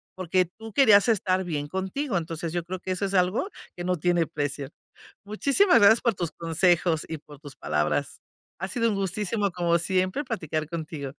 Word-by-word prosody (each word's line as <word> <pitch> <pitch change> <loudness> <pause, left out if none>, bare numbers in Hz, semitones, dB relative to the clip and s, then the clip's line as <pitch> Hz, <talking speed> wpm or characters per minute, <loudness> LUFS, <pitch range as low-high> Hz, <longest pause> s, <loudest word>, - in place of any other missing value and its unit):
porque 185 0 +1
tú 220 +6 -12
querías 215 -6 +6
estar 190 -3 +1
bien 150 -5 -3
contigo, 190 - -2
entonces 165 0 -5
yo 175 -1 -1
creo 185 +1 -6
que 185 - -5
eso 185 +2 -1
es 195 0 -2
algo 185 - +1 0.3
que 175 - -6
no 180 0 0
tiene 175 0 +1
precio, 145 -3 -4 0.6
muchísimas 275 - +3
gracias 220 +3 +6
por 235 -3 +2
tus 170 -3 -3
consejos 165 0 +1
y 160 - -4
por 145 -1 -15
tus 145 -2 -11
palabras. 75 +1 -1 0.4
Ha 190 - -3
sido 230 +3 0
un 210 - -1
gustazo 200 +1 -1
como 170 -1 +1
siempre, 185 - 0
platicar 155 - -3
contigo. 155 -3 -5
180 Hz, 180 wpm, -26 LUFS, 160-200 Hz, 0.6 s, querías